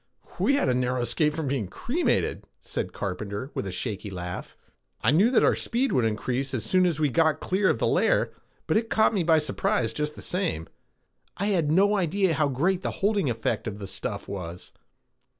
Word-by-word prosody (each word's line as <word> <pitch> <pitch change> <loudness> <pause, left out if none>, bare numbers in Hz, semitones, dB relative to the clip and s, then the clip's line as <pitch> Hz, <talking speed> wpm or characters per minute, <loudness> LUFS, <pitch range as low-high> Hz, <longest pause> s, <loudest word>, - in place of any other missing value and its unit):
"We 275 - +3
had 280 - +1
a 130 - +3
narrow 125 0 0
escape 150 +5 +1
from 160 -3 -2
being 130 -7 -1
cremated," 275 - -1 0.2
said - - -4
Carpenter 100 +6 -4
with 100 - -3
a - - -4
shaky 105 +1 -3
laugh. 90 -2 -6 0.4
"I 115 - +3
knew 190 +10 +5
that 250 - +4
our - - +4
speed 255 +3 0
would 125 -3 +2
increase 125 +5 -1
as 115 - -2
soon 185 -1 +3
as 165 -3 -1
we 150 - +3
got 160 +1 +3
clear 190 +1 +1
of - - +2
the - - 0
layer - - +2 0.3
but - - +2
it 225 0 -1
caught 220 +1 +3
me 200 - +1
by 165 -1 +4
surprise 130 -5 0
just 150 0 -2
the - - -8
same. 175 - -1 0.7
I 200 +3 0
had 165 -7 +1
no 200 +5 +4
idea 190 -1 +1
how 155 -1 +2
great 170 +8 0
the - - -2 0.2
holding 200 -8 +2
effect 110 -1 -2
of 105 -2 -4
the 100 -2 -7
stuff - - -5
was. 90 -3 -7
150 Hz, 205 wpm, -26 LUFS, 110-185 Hz, 0.7 s, knew